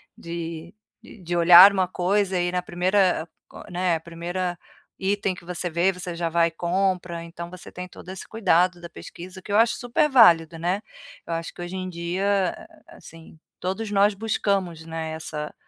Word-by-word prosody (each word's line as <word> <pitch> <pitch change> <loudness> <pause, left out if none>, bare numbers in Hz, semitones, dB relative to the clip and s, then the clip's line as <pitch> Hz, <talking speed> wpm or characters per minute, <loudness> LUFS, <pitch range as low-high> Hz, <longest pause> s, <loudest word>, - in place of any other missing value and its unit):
de 170 0 -7 0.3
e 220 - -15
de 175 0 -3
olhar 175 +3 +9
uma 185 -2 +1
coisa 190 +1 0
e 175 0 0
na 180 0 -1
primeira 180 -1 +1 0.2
coi - - -12
né, 175 -2 0
primeira 175 +2 -4 0.4
item 195 -1 -1
que 175 - -14
você 180 0 -3
vê, 170 +4 +2
você 180 -1 -6
já 170 -1 -2
vai 170 0 +3
e - - -6
compra. 180 0 -1
Então, 170 +1 -8
você 185 0 -11
tem 180 0 -7
todo 180 - -14
esse 190 - -6
cuidado 180 -4 +2
da 170 0 -9
pesquisa, 185 +2 -11
o - - -42
que 205 - -8
eu 205 - +3
acho 230 +1 +4
super 255 +5 +1
válida, 170 - +5
né. 180 +5 -1 0.5
Eu 170 - -3
acho 165 0 -4
que - - -10
hoje 175 +2 -6
em 185 0 -4
dia, 190 - -1 0.3
a 335 - -15
a - - -15
assim, 165 -1 -14 0.2
todos 200 +4 -3
nós 200 +1 +4
buscamos, 195 -6 -2
né, 160 -1 -5
essa 155 -1 -6
180 Hz, 190 wpm, -24 LUFS, 170-190 Hz, 0.5 s, olhar